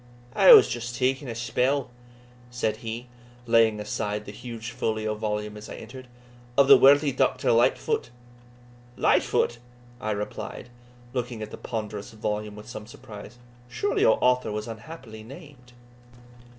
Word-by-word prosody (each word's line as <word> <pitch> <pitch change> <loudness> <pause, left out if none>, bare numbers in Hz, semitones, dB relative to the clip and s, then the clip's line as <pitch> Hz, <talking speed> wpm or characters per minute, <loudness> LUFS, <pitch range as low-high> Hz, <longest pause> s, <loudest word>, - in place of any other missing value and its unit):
"I - - +7
was 435 - +9
just 120 0 -4
taking 130 +2 0
a 115 - -5
spell," 125 +3 0 0.6
said 115 -3 -2
he, 115 +1 -6 0.4
laying 115 -2 +4
aside 105 0 -3
the - - -7
huge 115 +1 -7
folio 110 -3 -2
volume 105 -1 -3
as 105 0 -10
I - - -7
entered, 130 0 -10 0.5
"of 140 -1 +6
the - - +10
worthy 145 +1 +6
Doctor 130 - +1
Lightfoot." 115 +1 +2 0.9
"Lightfoot!" 120 - +2 0.4
I 110 - -4
replied, 105 +3 -5 0.4
looking 120 -3 -3
at 105 - -8
the - - -6
ponderous 105 -3 -6
volume 105 -1 -3
with 105 0 -11
some 110 -3 -8
surprise; 110 0 -11 0.3
"surely 195 +12 -1
your 110 - +5
author 125 -2 +2
was 105 +1 -4
unhappily 115 -1 -9
named." 130 0 -13
115 Hz, 140 wpm, -26 LUFS, 105-125 Hz, 0.9 s, the